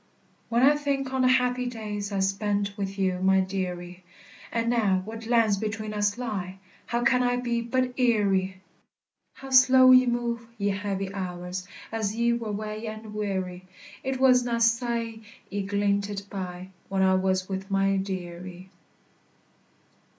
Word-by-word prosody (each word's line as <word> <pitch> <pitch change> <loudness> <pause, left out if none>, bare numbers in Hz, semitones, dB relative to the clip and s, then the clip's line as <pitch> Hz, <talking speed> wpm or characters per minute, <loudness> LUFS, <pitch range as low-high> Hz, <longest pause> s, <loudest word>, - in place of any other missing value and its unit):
When 235 +2 +2
I 290 +2 +6
think 275 -2 -2
on 265 - +1
the 255 - +4
happy 250 -1 +2
days 210 -3 -5
I 195 -1 0
spent 200 +1 0
wi' 200 -2 -2
you, 190 -2 -1
my 190 +1 +4
dearie; 180 -1 -4 0.5
And 230 0 -1
now 205 -6 +2
what 225 +1 -7
lands 230 -4 +3
between 215 0 -3
us 205 +1 0
lie, 195 -6 -4 0.3
How 235 +1 -1
can 250 +1 +4
I 245 0 +2
be 240 -1 -1
but 250 +2 -1
eerie! 195 -6 +2 0.7
How 270 0 -10
slow 260 0 +7
ye 255 0 +7
move, 235 -1 -1
ye 205 -1 0
heavy 195 -1 -3
hours, 180 -1 -5 0.2
As 220 -2 -2
ye 235 +1 +2
were 230 -2 -3
wae 215 +2 -4
and 215 0 -7
weary! 190 -3 -3 0.4
It 265 0 -2
was 255 -2 +5
na 240 -1 -1
sae 230 -1 +1 0.3
ye 200 0 -1
glinted 200 0 -1
by 185 -1 -6 0.2
When 190 0 +1
I 190 0 +4
was 185 0 +1
wi' 190 -1 -3
my 195 0 +2
dearie. 185 -1 -6
210 Hz, 155 wpm, -26 LUFS, 190-235 Hz, 0.7 s, slow